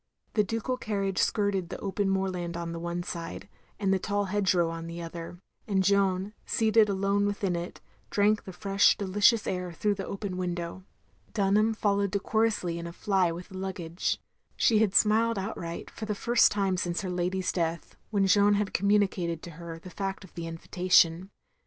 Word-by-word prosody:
The 210 - +3
ducal 230 +4 -2
carriage 195 -5 -2
skirted 200 -4 +1
the - - -5
open 200 0 -1
moorland 185 -3 -1
on 170 -1 -4
the 165 - -5
one 170 +1 -3
side, 170 +2 -6 0.3
and 195 -2 +2
the 190 - +2
tall 205 +2 -1
hedge 195 -1 +1
row 170 -2 +2
on 165 0 -6
the 170 +1 -6
other, 170 +1 -7 0.3
and 195 -3 +2
Jeanne 195 0 +2
seated 220 -2 +3
alone 200 +1 +1
within 200 -3 -1
it, 170 +1 -6 0.3
drank 210 +1 +2
the 190 - -7
fresh 195 +2 +3
delicious 205 +3 +3
air 180 -1 -2
through 205 +5 0
the 195 -1 -5
open 195 -2 -4
window. 175 0 -4 0.5
Dtinham 210 +2 +2
followed 200 -2 +1
decorously 200 -3 0
in 170 - -5
a - - -6
fly 185 -1 +1
with 175 +3 -8
the 190 -1 -7
luggage. 180 -3 -2 0.4
She 220 -2 +4
had 210 -3 +2
smiled 225 +1 +4
outright, 190 -4 -5
for 220 - -6
the 210 -1 -2
first 235 +3 +4
time 195 -2 0
since 175 -1 -1
her 185 -2 -4
lady's 180 +1 -1
death, 165 -2 -2
when 200 -3 +2
Jeanne 205 +2 +5
had 205 -1 -1
com 200 +2 +1
mtmicated 185 -5 +1
to 175 - -9
her 165 0 -8
the 180 +2 -11
fact 195 +1 -4
of 190 - -15
the 170 -1 -5
invitation. 175 +1 +2
190 Hz, 185 wpm, -28 LUFS, 175-205 Hz, 0.5 s, Jeanne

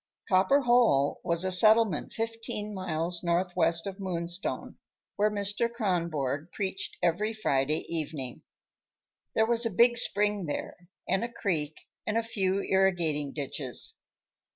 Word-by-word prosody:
Copper 195 +10 +4
Hole 240 - +3
was 170 +2 0
a 185 - 0
settlement 215 -2 +5
fifteen 225 -2 -4
miles 175 -2 -2
northwest 170 -1 +1
of 195 0 -6
Moonstone 175 -1 -3 0.4
where 210 +1 +2
Mr. 205 +3 -1
Kronborg 170 - -2
preached 190 -2 -3
every 180 +6 +1
Friday 150 -7 0
evening. 150 -6 -4 0.9
There 220 - +4
was 235 +1 +1
a 230 - +2
big 235 +4 +4
spring 205 -4 +1
there 175 +4 -6 0.2
and 190 +4 +1
a 235 - -4
creek 160 -10 -2 0.3
and 215 +1 0
a 230 - +1
few 195 -3 0
irrigating 170 -7 +1
ditches. 140 -3 -2
185 Hz, 130 wpm, -28 LUFS, 165-215 Hz, 0.9 s, settlement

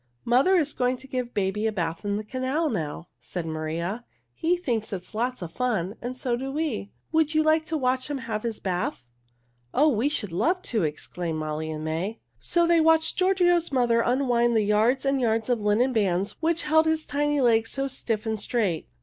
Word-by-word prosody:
"Mother 260 +11 +4
is 300 -5 +2
going 250 0 0
to 265 +2 -11
give 250 -2 -4
baby 205 +2 0
a - - 0
bath 170 -5 -3
in 200 0 -1
the 210 - -3
canal 260 +7 -1
now," 160 +1 -4
said 175 -3 -5
Maria. 165 +7 -3 0.3
"He 345 +2 +1
thinks 235 -10 -2
it 185 -3 -4
is - - -17
lots 240 -1 -2
of 165 - -7
fun 215 -6 -1
and 250 +2 -5
so 250 -2 -1
do 265 +2 -4
we. 280 -9 -2 0.2
Would 320 -1 +2
you 310 - +4
like 315 0 +3
to 320 0 -2
watch 255 0 0
him 290 - -2
have 230 -4 -4
his 230 -1 -4
bath?" 180 -9 -2 0.7
"Oh, 300 +3 +5
we 255 +1 +1
should 210 - -3
love 350 - +1
to!" 225 -4 -1
exclaimed 160 +2 -3
Molly 155 0 -3
and 155 -1 -5
May. 170 +8 -3 0.2
So 345 -1 +2
they 335 -1 +4
watched 320 0 +3
Giorgio's 355 -3 +3
mother 240 -3 +3
unwind 240 -2 +2
the 215 - +3
yards 220 +6 +2
and 275 -1 +1
yards 225 -1 +1
of 240 -3 +1
linen 220 +5 +2
bands 195 -3 +1
which 330 +1 +1
held 315 +1 +4
his 320 0 +1
tiny 295 0 0
legs 225 -3 +3
so 275 0 -2
stiff 230 -5 -3
and 220 -1 -1
straight. 200 -9 -1
240 Hz, 205 wpm, -26 LUFS, 205-290 Hz, 0.7 s, Oh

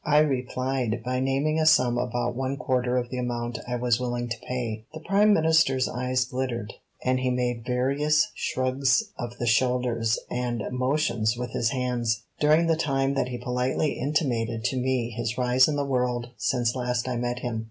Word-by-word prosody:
I 150 0 +3
replied 130 -4 0
by 125 0 -1
naming 135 +4 +1
a 155 - +2
sum 125 -6 +4
about 120 0 -1
one 135 +2 -2
quarter 125 -3 0
of 120 -1 -2
the 130 - -3
amount 120 -1 -3
I 125 - -2
was 120 -1 +1
willing 120 -1 -2
to 115 - -3
pay. 115 -4 -3
The - - -5
Prime 200 +5 +3
Minister's 160 -7 +3
eyes 125 0 -1
glittered, 125 -5 -3 0.3
and 130 0 +2
he 130 0 0
made 125 -2 -1
various 145 +8 +2
shrugs 130 - +1 0.2
of 120 0 -5
the 120 - -2
shoulders 120 -1 +2
and 120 -3 -2
motions 125 -4 0
with 125 -1 -4
his 115 - 0
hands, 120 -3 -1 0.2
during 155 +3 +4
the 165 -1 +3
time 135 -3 0
that 135 -2 0
he 125 - -4
politely 125 +4 0
intimated 120 -6 -1
to 130 - 0
me 125 -2 0
his 115 +1 -3
rise 125 +1 +4
in 150 - -1
the 145 -1 0
world 125 -2 -1
since 120 0 0
last 125 -1 -1
I 125 - -1
met 120 0 -2
him. 115 -3 -2
125 Hz, 185 wpm, -26 LUFS, 120-135 Hz, 0.3 s, sum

